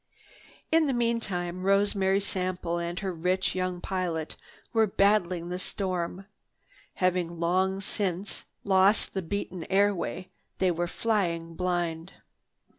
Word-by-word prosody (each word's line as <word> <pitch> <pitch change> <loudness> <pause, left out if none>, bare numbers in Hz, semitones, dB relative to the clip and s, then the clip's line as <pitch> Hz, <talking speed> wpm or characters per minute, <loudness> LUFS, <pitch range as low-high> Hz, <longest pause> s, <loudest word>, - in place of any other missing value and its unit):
In 320 -1 +5
the 270 - +1
meantime 195 -7 -1
Rosemary 195 0 +3
Sample 180 -3 -1
and 170 +1 -3
her 190 -2 -2
rich 180 +3 0
young 185 -1 -1
pilot 175 -4 -2 0.4
were 225 -1 +4
battling 190 -4 +2
the 180 +1 -3
storm. 185 -1 -2 0.7
Having 180 -2 0
long 185 +3 +1
since 195 -1 -3 0.2
lost 195 +1 +4
the 190 - -1
beaten 185 -1 -4
airway, 190 -2 +1 0.3
they 185 -1 +3
were 175 +1 -1
flying 170 -6 -1
blind. 175 -1 -2
185 Hz, 115 wpm, -28 LUFS, 175-195 Hz, 0.7 s, In